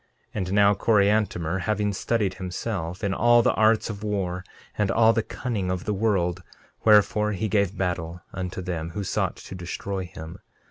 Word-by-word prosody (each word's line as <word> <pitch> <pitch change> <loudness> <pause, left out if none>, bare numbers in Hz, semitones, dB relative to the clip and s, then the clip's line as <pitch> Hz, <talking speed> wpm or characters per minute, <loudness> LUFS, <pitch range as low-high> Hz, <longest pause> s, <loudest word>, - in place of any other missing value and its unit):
13:16 - - -6
And 95 -1 -2
now 100 0 +5
Coriantumr, 100 -5 +2
having 105 +1 0
studied, 100 -1 0
himself, 95 -1 -4
in 100 -2 +1
all 120 +3 +5
the - - +3
arts 110 0 +3
of 105 -2 -6
war 95 -3 -2 0.3
and 105 -2 0
all 115 +1 +5
the 115 - +1
cunning 110 -5 -3
of 90 -1 -2
the 105 - 0
world, 95 -4 0 0.4
wherefore 105 0 +4
he 100 +3 -1
gave 100 -1 +1
battle 90 -2 -3
unto 95 0 -4
them 85 -3 -3
who 100 - -1
sought - - -1
to - - -11
destroy 95 +1 -4
him. 80 -2 -9
100 Hz, 175 wpm, -25 LUFS, 90-105 Hz, 0.4 s, now